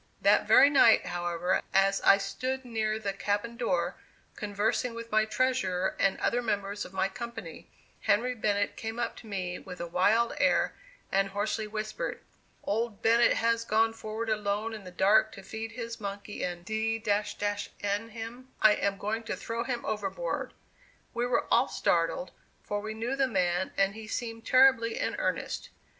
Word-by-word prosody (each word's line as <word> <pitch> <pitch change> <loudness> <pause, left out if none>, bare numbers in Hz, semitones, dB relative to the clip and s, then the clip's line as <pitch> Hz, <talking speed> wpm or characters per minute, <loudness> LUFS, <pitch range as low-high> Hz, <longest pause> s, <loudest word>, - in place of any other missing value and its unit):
That - - +4
very 280 - +7
night, 250 -5 +6
however, 175 0 -1
as 195 0 +4
I 195 - +7
stood 255 +7 -3
near 220 -2 -1
the 205 -3 -3
cabin 205 +4 -2
door, 245 +3 -1 0.4
conversing 220 +3 -1
with 230 0 -8
my 215 0 +4
treasurer 215 -6 0
and 195 -1 +2
other 245 - +1
members 205 -3 -2
of - - -11
my 190 0 +1
company, 235 +5 -8 0.3
Henry 235 +5 +2
Bennett 205 -3 0
came 225 +1 -5
up 240 - -2
to 225 - -12
me 185 -3 -3
with 180 - -10
a 170 - -3
wild 210 +7 +2
air, - - +3 0.4
and 195 0 +2
hoarsely 210 +2 -2
whispered: 215 - -4 0.4
"Old 220 0 -2
Bennett 230 +1 +5
has 230 0 +1
gone 225 0 +2
forward 225 0 -4
alone 210 +1 -1
in 210 -3 -8
the - - -7
dark 205 +4 +4
to 195 - -10
feed 225 +3 -6
his 230 -1 -6
monkey, 200 +1 -5
and 175 -1 -4
d 220 +2 -1 0.9
n 205 +3 -1
him, 230 +3 -8
I 215 - +7
am 200 -1 -1
going 215 +3 -2
to - - -2
throw 230 +1 -3
him 240 -1 -3
overboard." 215 - -3 0.6
We 240 +1 0
were 245 -1 +1
all - - +5
startled, - - 0 0.3
for 205 - -2
we 215 +1 -5
knew 235 +4 -2
the 270 -1 +2
man 180 -5 0
and 195 0 +3
he 220 0 -9
seemed 225 0 -5
terribly 255 -3 +5
in - - -1
earnest. - - -2
220 Hz, 170 wpm, -29 LUFS, 200-230 Hz, 0.9 s, very